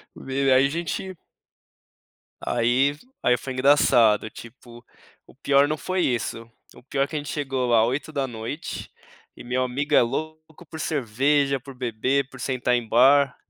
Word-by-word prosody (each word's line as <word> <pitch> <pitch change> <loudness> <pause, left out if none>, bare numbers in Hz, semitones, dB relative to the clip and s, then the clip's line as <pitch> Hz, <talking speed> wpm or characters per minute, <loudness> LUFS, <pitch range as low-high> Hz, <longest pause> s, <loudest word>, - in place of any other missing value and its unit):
Meu, 135 0 0
aí 130 +1 +5
a - - +1
gente 170 +4 -4 1.3
aí 120 +4 +2
f 145 +10 -15 0.2
aí 125 - +3
foi 130 +3 -6
engraçado, 125 -5 +4
tipo, 120 +1 -13 0.4
o - - -19
pior 140 +1 +3
não 155 +1 -2
foi 185 +4 -2
isso, 115 -4 -2 0.2
o - - -16
pior 135 +2 -1
é - - -2
que 155 - -8
a - - 0
gente 145 -1 -8
chegou 135 -4 -2
lá 115 -2 +4
20h, 135 0 -4 0.5
e - - -11
meu 125 +1 -1
amigo 140 +4 -3
é - - +7
louco 155 +6 -5
por 160 - -8
cerveja, 140 0 0
por 135 +1 -12
beber, 130 +3 -1
por 135 - -13
sentar 125 -1 0
em 120 -2 -2
bar. 135 +4 +4
135 Hz, 165 wpm, -24 LUFS, 120-145 Hz, 1.3 s, é